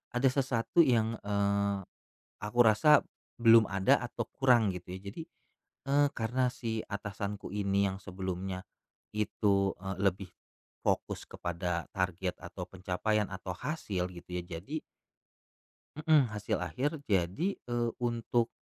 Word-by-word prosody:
ada 130 Hz, +2 st, +4 dB
sesuatu 130 Hz, +2 st, +2 dB
yang, 115 Hz, -2 st, +2 dB
eee, 100 Hz, -1 st, +1 dB, 0.6 s
aku 115 Hz, +4 st, -3 dB
rasa 125 Hz, +8 st, +6 dB, 0.4 s
belum 115 Hz, -1 st, +8 dB
ada 95 Hz, -1 st, +3 dB
atau -, -, -4 dB
kurang 120 Hz, -6 st, +4 dB
gitu 90 Hz, 0 st, -7 dB
ya. -, -, -7 dB
Jadi, 165 Hz, -, -7 dB, 0.7 s
eee, 145 Hz, +1 st, +5 dB
karena 125 Hz, +3 st, +1 dB
si 115 Hz, -2 st, -3 dB
atasanku 100 Hz, 0 st, -5 dB
ini 100 Hz, -1 st, +2 dB
yang 95 Hz, -, -5 dB
sebelumnya 95 Hz, 0 st, -4 dB, 0.5 s
itu, 100 Hz, -2 st, +2 dB
eee, 95 Hz, +1 st, -5 dB
lebih 95 Hz, -1 st, +1 dB, 0.6 s
fokus -, -, 0 dB
kepada 85 Hz, 0 st, -3 dB
target 95 Hz, -1 st, -1 dB
atau -, -, -7 dB
pencapaian 100 Hz, +3 st, 0 dB
atau 95 Hz, 0 st, -5 dB
hasil 100 Hz, -, -2 dB
gitu 85 Hz, -, -12 dB
ya -, -, -12 dB
jadi 145 Hz, -, -5 dB, 1.2 s
Mhm, 150 Hz, -6 st, +4 dB
hasil 105 Hz, -1 st, -1 dB
akhir 140 Hz, +4 st, -1 dB
jadi, 100 Hz, -, 0 dB
eee, 120 Hz, -1 st, 0 dB
untuk 120 Hz, -1 st, +1 dB
105 Hz, 125 wpm, -31 LUFS, 95-120 Hz, 1.2 s, belum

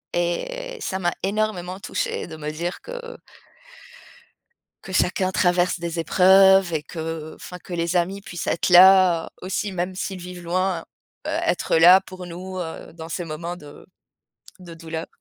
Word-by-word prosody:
et -, -, -2 dB
ça 190 Hz, -, -3 dB
m'a 175 Hz, -1 st, 0 dB
énormément 195 Hz, -3 st, -2 dB
touchée -, -, -3 dB
de 160 Hz, -, -9 dB
me 150 Hz, 0 st, -4 dB
dire 170 Hz, +4 st, -4 dB
que -, -, -9 dB, 1.9 s
que 190 Hz, -, -8 dB
chacun 185 Hz, 0 st, +1 dB
traverse 180 Hz, 0 st, +2 dB
des 170 Hz, 0 st, -3 dB
épreuves 190 Hz, +1 st, +5 dB
et 155 Hz, -2 st, -2 dB
que, 160 Hz, 0 st, -6 dB
enfin, 180 Hz, -, -9 dB
que 180 Hz, -, -10 dB
les 170 Hz, +1 st, 0 dB
amis 190 Hz, +3 st, -1 dB
puissent 180 Hz, -4 st, -7 dB
être 170 Hz, -, 0 dB
là 180 Hz, -2 st, +7 dB
aussi, 190 Hz, +2 st, -3 dB
même 180 Hz, +1 st, -2 dB
s'ils 185 Hz, 0 st, -5 dB
vivent 180 Hz, 0 st, -8 dB
loin, 180 Hz, 0 st, -1 dB, 0.4 s
heu, -, -, -2 dB
être -, -, 0 dB
là 175 Hz, +3 st, +8 dB
pour 185 Hz, -1 st, -10 dB
nous, 185 Hz, +2 st, -7 dB
heu, 160 Hz, -1 st, -7 dB
dans 165 Hz, -1 st, -9 dB
ces 175 Hz, +1 st, -4 dB
moments 170 Hz, +3 st, -5 dB
de 145 Hz, -3 st, -13 dB, 0.7 s
de 175 Hz, -2 st, -11 dB
douleur. 165 Hz, 0 st, -6 dB
180 Hz, 160 wpm, -23 LUFS, 170-190 Hz, 1.9 s, là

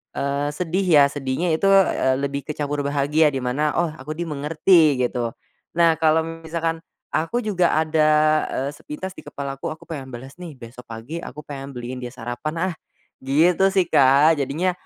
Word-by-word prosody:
eee, 140 Hz, +1 st, -1 dB
sedih 180 Hz, +3 st, -1 dB
ya 150 Hz, -4 st, +7 dB
sedihnya 145 Hz, +5 st, -2 dB
itu, 160 Hz, +5 st, +1 dB
eee, 190 Hz, -9 st, +4 dB
lebih 140 Hz, +1 st, -3 dB
kecampur 145 Hz, -1 st, -3 dB
bahagia 145 Hz, +2 st, +2 dB
di 135 Hz, -3 st, -4 dB
mana, 145 Hz, +5 st, 0 dB
"Oh, 170 Hz, -1 st, +1 dB
aku 155 Hz, +1 st, -8 dB
dimengerti," 155 Hz, -2 st, +2 dB
gitu. 120 Hz, -1 st, -2 dB, 0.4 s
Nah, 170 Hz, -1 st, +5 dB
kalo 160 Hz, 0 st, +3 dB
misalkan 165 Hz, 0 st, -3 dB, 0.3 s
aku 235 Hz, +10 st, -1 dB
juga 180 Hz, -5 st, +1 dB
ada, 155 Hz, 0 st, +2 dB, 0.5 s
eee, 135 Hz, +2 st, -1 dB
sepintas 150 Hz, +6 st, -7 dB
di -, -, -8 dB
kepalaku, 135 Hz, -1 st, -6 dB
"Aku 155 Hz, -, -16 dB
pengen 140 Hz, -5 st, -7 dB
balas 130 Hz, +6 st, -10 dB
nih 170 Hz, -5 st, -8 dB
besok 120 Hz, 0 st, -12 dB
pagi 115 Hz, +9 st, -7 dB
aku 150 Hz, -3 st, -9 dB
pengen 140 Hz, -2 st, -8 dB
beliin 125 Hz, +1 st, -6 dB
dia 125 Hz, -1 st, -6 dB
sarapan 155 Hz, +9 st, -3 dB
ah," -, -, -7 dB, 0.5 s
gitu 165 Hz, +8 st, +3 dB
sih 190 Hz, -2 st, +4 dB
Kak 140 Hz, +4 st, +5 dB
jadinya, 160 Hz, +7 st, 0 dB
150 Hz, 165 wpm, -22 LUFS, 135-165 Hz, 0.5 s, ya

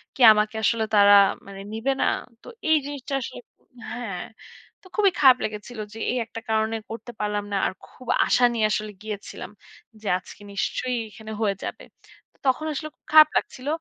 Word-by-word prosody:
কি 265 Hz, -, -6 dB
আমাকে 210 Hz, +1 st, 0 dB
আসলে 225 Hz, +1 st, +2 dB
তারা 205 Hz, 0 st, +7 dB, 0.3 s
মানে 195 Hz, 0 st, -9 dB
নিবে 235 Hz, +5 st, 0 dB
না। -, -, +3 dB, 0.4 s
তো -, -, -17 dB, 0.2 s
এই 315 Hz, -, +6 dB
জিনিসটা 280 Hz, -1 st, -6 dB
আসলে, -, -, -7 dB, 0.5 s
হ্যাঁ। 225 Hz, -7 st, -5 dB, 0.6 s
তো -, -, -28 dB
খুবই 405 Hz, -3 st, +4 dB
খারাপ 260 Hz, -3 st, +7 dB
লেগেছিল 215 Hz, +2 st, -5 dB
যে -, -, -10 dB
এই 255 Hz, -, -1 dB
একটা 225 Hz, 0 st, -8 dB
কারণে 220 Hz, 0 st, +1 dB
করতে 230 Hz, +2 st, -7 dB
পারলাম 210 Hz, -1 st, -1 dB
না। -, -, +2 dB
আর -, -, -1 dB
খুব 255 Hz, -, -16 dB, 0.2 s
আশা 245 Hz, -, +3 dB
নিয়ে 220 Hz, -2 st, +1 dB
আসলে 215 Hz, 0 st, -2 dB
গিয়েছিলাম। 205 Hz, -1 st, -7 dB, 0.5 s
যে 210 Hz, -, -7 dB
আজকে 200 Hz, -, -14 dB
নিশ্চয়ই 250 Hz, +5 st, -1 dB
এখানে 220 Hz, +1 st, -10 dB
হয়ে 200 Hz, -2 st, +1 dB
যাবে। -, -, -6 dB, 0.6 s
তখন 265 Hz, +4 st, +2 dB
আসলে 310 Hz, +2 st, -5 dB, 0.2 s
খারাপ 310 Hz, 0 st, +9 dB
লাগছিল। 260 Hz, +2 st, -4 dB
225 Hz, 170 wpm, -24 LUFS, 210-255 Hz, 0.6 s, খারাপ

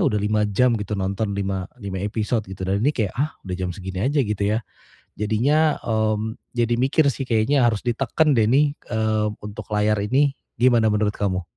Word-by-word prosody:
udah 105 Hz, -, +1 dB
5 105 Hz, 0 st, +1 dB
jam 120 Hz, +5 st, +3 dB
gitu 105 Hz, 0 st, -4 dB
nonton, 100 Hz, +2 st, -2 dB
lima 95 Hz, -2 st, -2 dB, 0.2 s
lima 95 Hz, -1 st, -4 dB
episode 105 Hz, +2 st, -1 dB
gitu. 95 Hz, 0 st, -7 dB
Dan 95 Hz, +2 st, 0 dB
ini 140 Hz, -, +4 dB
kayak, 105 Hz, -6 st, 0 dB
ah 150 Hz, +3 st, +1 dB
udah 90 Hz, -2 st, -4 dB
jam 90 Hz, -1 st, -2 dB
segini 95 Hz, 0 st, -6 dB
aja 140 Hz, +4 st, +2 dB
gitu 105 Hz, -2 st, -2 dB
ya. 110 Hz, +2 st, 0 dB, 0.6 s
Jadinya 140 Hz, +9 st, +2 dB
mmm, 110 Hz, 0 st, -1 dB, 0.2 s
jadi 120 Hz, 0 st, +2 dB
mikir 135 Hz, +4 st, +3 dB
sih 135 Hz, -, -5 dB
kayaknya 125 Hz, +4 st, +2 dB
harus 110 Hz, -3 st, -1 dB
diteken 135 Hz, +5 st, +1 dB
deh 110 Hz, -2 st, +4 dB
nih 145 Hz, +3 st, +3 dB, 0.2 s
eee, 110 Hz, -1 st, +1 dB, 0.2 s
untuk 105 Hz, 0 st, -8 dB
layar 105 Hz, 0 st, +2 dB
ini. 140 Hz, +4 st, +3 dB, 0.3 s
Gimana 120 Hz, -3 st, +4 dB
menurut 105 Hz, 0 st, +1 dB
kamu? 95 Hz, -3 st, -1 dB
110 Hz, 185 wpm, -23 LUFS, 100-125 Hz, 0.6 s, ini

